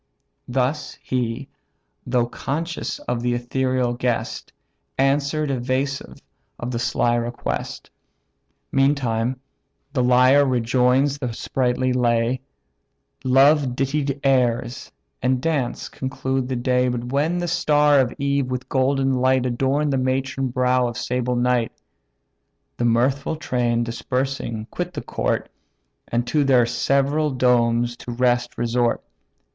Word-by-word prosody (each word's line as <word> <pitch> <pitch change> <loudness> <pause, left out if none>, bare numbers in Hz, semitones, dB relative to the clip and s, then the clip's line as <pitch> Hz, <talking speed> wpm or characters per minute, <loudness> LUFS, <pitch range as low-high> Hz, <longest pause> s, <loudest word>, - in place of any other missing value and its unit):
Thus 130 +3 -1
he, 125 +1 -2 0.6
though 125 -1 +2
conscious 160 +8 -4
of 120 -1 -3
the 120 0 0
ethereal 125 0 0
guest, 120 -1 -2 0.5
Answer'd 140 +2 +1
evasive 130 +2 -2 0.4
of 120 - -4
the 120 - -2
sly 120 0 +1
request. 120 0 -3 0.8
Meantime 130 -3 +1 0.5
the 130 - +1
lyre 130 +3 +5
rejoins 130 +2 +2
the 125 -4 -3
sprightly 125 +1 0
lay; 120 0 +1 0.8
Love 135 0 +4
dittied 140 +1 -1
airs, 125 -2 +1 0.3
and 130 0 +1
dance, 145 -4 -1
conclude 130 0 -3
the 130 - -2
day 125 +1 +1
But 120 0 -3
when 150 +5 +1
the 175 0 -2
star 150 -4 +3
of 125 -2 +2
eve 140 -1 0
with 125 0 -4
golden 135 0 +2
light 130 0 +2
Adorn'd 135 +4 0
the 135 - +1
matron 135 +1 -1
brow 125 0 +2
of 120 - -5
sable 125 0 -1
night, 120 -1 +1 1.0
The 120 - 0
mirthful 130 +6 +1
train 120 -7 0
dispersing 120 -1 -3
quit - - -4
the - - -4
court, - - -2 0.6
And 120 +1 -1
to 150 +3 +1
their 130 -3 +4
several 140 +5 +1
domes 120 -2 +2
to 120 - -7
rest 120 0 +1
resort. 120 0 0
130 Hz, 120 wpm, -22 LUFS, 120-135 Hz, 1.0 s, lyre